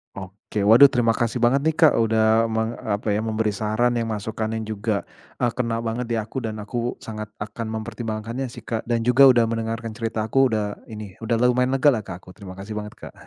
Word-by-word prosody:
Oke. 100 Hz, +2 st, -5 dB
Waduh 115 Hz, +7 st, +8 dB
terima 120 Hz, -3 st, +2 dB
kasih 120 Hz, +1 st, -1 dB
banget 130 Hz, +4 st, +4 dB
nih 160 Hz, -, +1 dB
Kak, 160 Hz, -2 st, +6 dB
udah 110 Hz, 0 st, +3 dB
meng 110 Hz, +1 st, -1 dB
apa 105 Hz, 0 st, -2 dB
ya? 105 Hz, -, +1 dB
memberi 110 Hz, -1 st, -1 dB
saran 110 Hz, +4 st, 0 dB
yang 115 Hz, -, -2 dB
masukannya 110 Hz, +1 st, -3 dB
juga, 110 Hz, -1 st, -2 dB, 0.3 s
e -, -, -6 dB
kena 115 Hz, -2 st, -2 dB
banget 115 Hz, +1 st, -3 dB
di 115 Hz, -, -1 dB
aku 110 Hz, +4 st, -3 dB
dan 110 Hz, -3 st, -4 dB
aku 115 Hz, +3 st, -3 dB
sangat 105 Hz, -1 st, -6 dB
akan 110 Hz, +2 st, -6 dB
mempertimbangkannya 115 Hz, +3 st, -4 dB
sih 120 Hz, -1 st, -11 dB
Kak. 115 Hz, 0 st, -4 dB
Dan 115 Hz, -1 st, 0 dB
juga 130 Hz, +3 st, +6 dB
udah 120 Hz, -3 st, +5 dB
mendengarkan 115 Hz, 0 st, -3 dB
cerita 115 Hz, -1 st, -3 dB
aku 135 Hz, +4 st, +3 dB
udah 105 Hz, -3 st, -2 dB
ini, 105 Hz, -4 st, -9 dB
udah 115 Hz, +1 st, -1 dB
lumayan 125 Hz, +2 st, +2 dB
lega 140 Hz, +2 st, +5 dB
lah 115 Hz, -, 0 dB
Kak 90 Hz, -4 st, -9 dB
aku. -, -, -15 dB
Terima 95 Hz, -2 st, -11 dB
kasih 105 Hz, +2 st, -6 dB
banget 105 Hz, 0 st, -8 dB
Kak. -, -, -11 dB
115 Hz, 210 wpm, -23 LUFS, 110-120 Hz, 0.3 s, Waduh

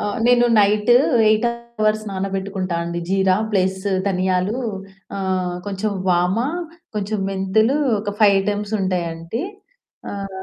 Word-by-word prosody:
ఆ! -, -, -3 dB, 0.2 s
నేను 245 Hz, 0 st, +5 dB
night 210 Hz, +2 st, +3 dB, 0.4 s
8 215 Hz, +2 st, +3 dB
hours 215 Hz, -2 st, -2 dB
నానబెట్టుకుంటా 190 Hz, -2 st, -3 dB
అండి. 170 Hz, 0 st, -3 dB
జీరా 190 Hz, -1 st, +3 dB, 0.2 s
ప్లస్ 190 Hz, -2 st, +1 dB, 0.3 s
ధనియాలు, 185 Hz, +3 st, 0 dB, 0.6 s
ఆహ్, 185 Hz, -2 st, -1 dB
కొంచెం 205 Hz, +1 st, -2 dB, 0.2 s
వామ, 180 Hz, +2 st, +2 dB, 0.6 s
కొంచెం 210 Hz, 0 st, -2 dB
మెంతులు, 215 Hz, +7 st, +2 dB, 0.2 s
ఒక 205 Hz, -1 st, -4 dB
5 200 Hz, -2 st, +6 dB
ఐటెమ్స్ 205 Hz, +1 st, -2 dB
ఉంటాయండి. 175 Hz, +2 st, -2 dB, 0.7 s
ఆహ్, 195 Hz, -1 st, -6 dB
195 Hz, 115 wpm, -21 LUFS, 185-215 Hz, 0.7 s, 5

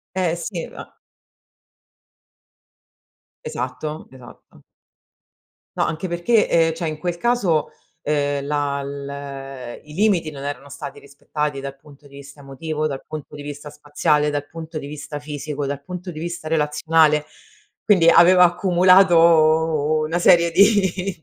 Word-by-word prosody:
Eh, 180 Hz, -3 st, 0 dB
sì, 170 Hz, 0 st, -5 dB
ma -, -, -11 dB, 2.5 s
Esatto, 130 Hz, +5 st, -5 dB
esatto. 130 Hz, -2 st, -16 dB, 1.1 s
No, -, -, +2 dB
anche 170 Hz, +3 st, -3 dB
perché, 175 Hz, +6 st, +2 dB
ehm, 165 Hz, -1 st, +3 dB
cioè 165 Hz, 0 st, -3 dB
in 155 Hz, -1 st, -5 dB
quel 175 Hz, +1 st, -3 dB
caso, 190 Hz, -9 st, +1 dB, 0.3 s
ehm, 145 Hz, -1 st, -1 dB
la 145 Hz, -1 st, -1 dB
l 140 Hz, -2 st, -7 dB
i 150 Hz, 0 st, -13 dB
limiti 185 Hz, -5 st, +1 dB
non 140 Hz, -1 st, -9 dB
erano 145 Hz, 0 st, -6 dB
stati 140 Hz, +1 st, -8 dB
rispettati 140 Hz, 0 st, -5 dB
dal 135 Hz, 0 st, -7 dB
punto 145 Hz, 0 st, -18 dB
di 140 Hz, -, -15 dB
vista 140 Hz, +1 st, -13 dB
emotivo, 155 Hz, +3 st, -4 dB
dal 135 Hz, -2 st, -6 dB
punto 155 Hz, -1 st, -8 dB
di 145 Hz, -, -8 dB
vista 145 Hz, 0 st, -8 dB
spaziale, 150 Hz, 0 st, 0 dB
dal 145 Hz, 0 st, -3 dB
punto 160 Hz, +1 st, -8 dB
di 140 Hz, -, -8 dB
vista 145 Hz, 0 st, -7 dB
fisico, 145 Hz, -1 st, -5 dB
dal 140 Hz, 0 st, -4 dB
punto 180 Hz, +2 st, -7 dB
di 155 Hz, -, -9 dB
vista 170 Hz, -1 st, -5 dB
relazionale, 150 Hz, 0 st, +2 dB, 0.6 s
quindi 180 Hz, -6 st, +4 dB
avevo 180 Hz, +2 st, +6 dB
accumulato 170 Hz, -4 st, +4 dB
una 165 Hz, +3 st, -1 dB
serie 170 Hz, -1 st, +5 dB
di 190 Hz, -2 st, +2 dB
155 Hz, 135 wpm, -21 LUFS, 145-170 Hz, 2.5 s, avevo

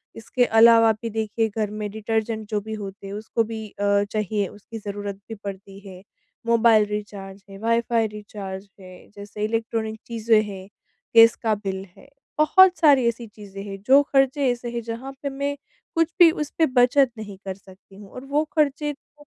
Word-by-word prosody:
इसके 245 Hz, +2 st, 0 dB
अलावा 230 Hz, 0 st, +6 dB
भी 230 Hz, -, -3 dB
देखिए 220 Hz, +1 st, -1 dB
घर 215 Hz, -2 st, 0 dB
में 210 Hz, -1 st, -4 dB
डिटर्जेंट 220 Hz, 0 st, -3 dB
जो 210 Hz, -1 st, 0 dB
भी 220 Hz, +1 st, -7 dB
होते 200 Hz, -1 st, -7 dB
हैं 195 Hz, -, -7 dB
उसको 220 Hz, +2 st, -1 dB
भी 220 Hz, -1 st, -6 dB
अ, 200 Hz, 0 st, +1 dB
चाहिए 210 Hz, -1 st, -1 dB
उसकी 210 Hz, +4 st, -11 dB
ज़रूरत 205 Hz, -1 st, -5 dB
भी 225 Hz, -, -5 dB
पड़ती 195 Hz, 0 st, -8 dB
है, 185 Hz, -1 st, -11 dB, 0.5 s
मोबाइल 230 Hz, -2 st, +5 dB
रिचार्ज 200 Hz, -2 st, -7 dB
है, 195 Hz, -, -10 dB
वाई-फाई 230 Hz, 0 st, +1 dB
रिचार्ज 205 Hz, -2 st, -8 dB
है, 185 Hz, -1 st, -14 dB
जैसे 205 Hz, +1 st, -7 dB
इलेक्ट्रॉनिक 225 Hz, -1 st, -3 dB
चीज़ें 225 Hz, -1 st, +2 dB
हैं, 195 Hz, -2 st, -8 dB, 0.5 s
गैस 230 Hz, 0 st, +8 dB
का 220 Hz, -1 st, +2 dB
बिल 195 Hz, -2 st, -5 dB
है, 275 Hz, -, -17 dB, 0.3 s
बहुत 365 Hz, +4 st, +6 dB
सारी 280 Hz, -7 st, +5 dB
ऐसी 235 Hz, 0 st, -3 dB
चीज़ें 200 Hz, -2 st, -11 dB
हैं 195 Hz, -1 st, -8 dB
जो 275 Hz, +2 st, +7 dB
खर्चे 270 Hz, -1 st, +2 dB
ऐसे 240 Hz, 0 st, -5 dB
हैं 235 Hz, 0 st, -3 dB
जहाँ 235 Hz, +4 st, -6 dB
पे 280 Hz, -, -1 dB
मैं 280 Hz, +1 st, -3 dB, 0.4 s
कुछ 330 Hz, 0 st, +2 dB
भी 345 Hz, -2 st, +9 dB
उस 300 Hz, -2 st, -4 dB
पे 325 Hz, -, +4 dB
बचत 255 Hz, +1 st, +3 dB
नहीं 205 Hz, -3 st, -8 dB
कर 190 Hz, -, -3 dB
सकती 195 Hz, 0 st, -19 dB
हूँ 200 Hz, -1 st, -13 dB
और 255 Hz, -, -9 dB
वो 290 Hz, +3 st, +1 dB
खर्चे 295 Hz, 0 st, +1 dB
तो 295 Hz, +1 st, -23 dB
220 Hz, 185 wpm, -23 LUFS, 205-240 Hz, 0.5 s, भी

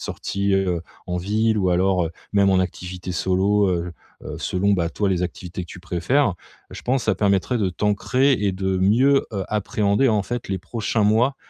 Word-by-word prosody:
sorties, 100 Hz, 0 st, -2 dB
heu, 90 Hz, -3 st, 0 dB, 0.2 s
en 90 Hz, 0 st, -2 dB
ville 110 Hz, +4 st, +1 dB
ou 95 Hz, -2 st, +1 dB
alors, 90 Hz, 0 st, +2 dB
heu, -, -, -6 dB, 0.2 s
même 100 Hz, -1 st, +4 dB
en 95 Hz, -, +3 dB
activité 90 Hz, 0 st, -5 dB
solo, 95 Hz, +4 st, +2 dB
heu 85 Hz, -1 st, -2 dB, 0.3 s
heu, -, -, -6 dB
selon 100 Hz, +2 st, 0 dB
bah 85 Hz, -3 st, +1 dB
toi, 100 Hz, -2 st, -1 dB
les 90 Hz, -2 st, 0 dB
activités 90 Hz, -1 st, -5 dB
que 85 Hz, -, -11 dB
tu -, -, -9 dB
préfères. 95 Hz, -, +1 dB, 0.4 s
Je -, -, -8 dB
pense 125 Hz, -1 st, 0 dB
ça 110 Hz, -, +2 dB
permettrait 100 Hz, +4 st, +1 dB
de 100 Hz, -3 st, +1 dB
t'ancrer 105 Hz, -, +1 dB
et 105 Hz, -5 st, +1 dB
de 95 Hz, 0 st, -1 dB
mieux, 125 Hz, +9 st, +4 dB
heu, 95 Hz, -2 st, -2 dB
appréhender, 105 Hz, +2 st, 0 dB
heu, -, -, +4 dB
en 105 Hz, -2 st, +1 dB
fait 120 Hz, 0 st, -5 dB
les 95 Hz, -, -1 dB
prochains 110 Hz, +3 st, -2 dB
mois, 120 Hz, +6 st, +3 dB
100 Hz, 200 wpm, -22 LUFS, 90-110 Hz, 0.4 s, même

